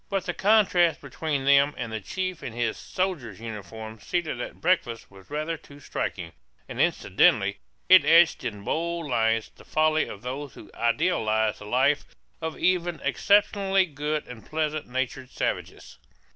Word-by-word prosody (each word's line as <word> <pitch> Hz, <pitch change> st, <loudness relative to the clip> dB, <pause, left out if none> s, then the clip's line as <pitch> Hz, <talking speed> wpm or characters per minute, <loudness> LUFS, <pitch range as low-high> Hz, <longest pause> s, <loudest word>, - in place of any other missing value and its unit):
But 195 Hz, -2 st, -1 dB
the 180 Hz, -, -2 dB
contrast 185 Hz, -6 st, +3 dB
between 140 Hz, 0 st, -3 dB
them 140 Hz, +1 st, +5 dB
and 115 Hz, -3 st, -4 dB
the 110 Hz, -, -2 dB
chief 185 Hz, -, -4 dB
in 115 Hz, -, -6 dB
his 115 Hz, -1 st, -1 dB
soldier's 155 Hz, -, -3 dB
uniform 110 Hz, 0 st, -8 dB
seated 160 Hz, -3 st, -2 dB
at -, -, -7 dB
breakfast 120 Hz, -, 0 dB
was 95 Hz, -1 st, -16 dB
rather 155 Hz, +3 st, -2 dB
too 140 Hz, 0 st, -16 dB
striking; 140 Hz, -, -4 dB, 0.4 s
and -, -, -3 dB
incidentally -, -, +3 dB, 0.3 s
it -, -, +8 dB
etched 165 Hz, -2 st, +5 dB
in 105 Hz, -5 st, -5 dB
bold 170 Hz, +5 st, -2 dB
lines 115 Hz, -4 st, +1 dB
the -, -, -16 dB
folly 155 Hz, 0 st, +2 dB
of 100 Hz, -, -9 dB
those 135 Hz, +2 st, -5 dB
who -, -, -13 dB
idealize 115 Hz, -, +1 dB
the 105 Hz, -, -10 dB
life 130 Hz, +6 st, +2 dB, 0.4 s
of 160 Hz, -1 st, -4 dB
even 175 Hz, -2 st, +1 dB
exceptionally 195 Hz, -, +3 dB
good 150 Hz, -1 st, -3 dB
and 120 Hz, -3 st, -10 dB
pleasant 155 Hz, -1 st, -2 dB
natured 130 Hz, +1 st, -3 dB
savages. -, -, -4 dB
145 Hz, 155 wpm, -26 LUFS, 115-170 Hz, 0.4 s, it